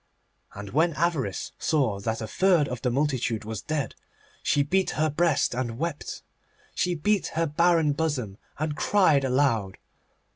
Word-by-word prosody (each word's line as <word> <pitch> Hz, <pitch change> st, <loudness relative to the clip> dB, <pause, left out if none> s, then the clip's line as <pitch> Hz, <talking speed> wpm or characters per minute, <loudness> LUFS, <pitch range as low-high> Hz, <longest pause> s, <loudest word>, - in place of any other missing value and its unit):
And 100 Hz, 0 st, -7 dB
when 160 Hz, +5 st, +2 dB
Avarice 150 Hz, -, -1 dB
saw 130 Hz, -11 st, +1 dB
that 110 Hz, +3 st, -3 dB
a -, -, -4 dB
third 175 Hz, -, +3 dB
of 125 Hz, -2 st, -5 dB
the 125 Hz, -, +1 dB
multitude 125 Hz, -4 st, -1 dB
was 110 Hz, -2 st, -5 dB
dead 155 Hz, -3 st, -2 dB, 0.5 s
she 145 Hz, -, +2 dB
beat 190 Hz, +6 st, +1 dB
her 155 Hz, 0 st, +2 dB
breast 155 Hz, -3 st, +2 dB
and 120 Hz, -2 st, -3 dB
wept. 165 Hz, +1 st, -4 dB, 0.5 s
She 180 Hz, -1 st, 0 dB
beat 200 Hz, +5 st, +1 dB
her 165 Hz, -, +3 dB
barren 165 Hz, -1 st, +3 dB
bosom, 135 Hz, -10 st, -2 dB, 0.2 s
and 155 Hz, 0 st, -2 dB
cried 160 Hz, -7 st, +3 dB
aloud. 125 Hz, -7 st, +1 dB
145 Hz, 150 wpm, -26 LUFS, 120-165 Hz, 0.5 s, third